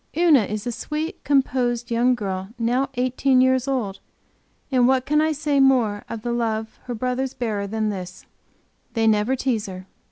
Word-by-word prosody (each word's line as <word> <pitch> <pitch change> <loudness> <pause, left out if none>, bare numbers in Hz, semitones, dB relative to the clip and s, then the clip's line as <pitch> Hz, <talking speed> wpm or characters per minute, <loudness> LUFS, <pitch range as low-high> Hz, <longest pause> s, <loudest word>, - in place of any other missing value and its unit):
Una 315 -10 +5
is 210 +2 -4
a 240 - -1
sweet 305 - -4
composed 250 -4 +1
young 245 +2 +3
girl 190 -4 -4
now 245 +4 0
eighteen 255 +1 +2
years 260 0 +3
old 225 -8 -2 0.7
and 250 -2 +4
what 260 -1 +2
can 300 +1 +2
I 315 0 +2
say 295 -1 0
more 245 -7 +3
of 225 -1 -6
the 240 - -2
love 225 -2 -2
her 245 - -4
brothers 255 +3 -2
bear 220 -4 -2
her 200 - -3
than 215 +1 -1
this: 185 -2 -7 0.7
they 225 -1 +1
never 220 +4 +3
tease 240 -5 -1
her. 185 -1 -8
245 Hz, 180 wpm, -23 LUFS, 220-265 Hz, 0.7 s, Una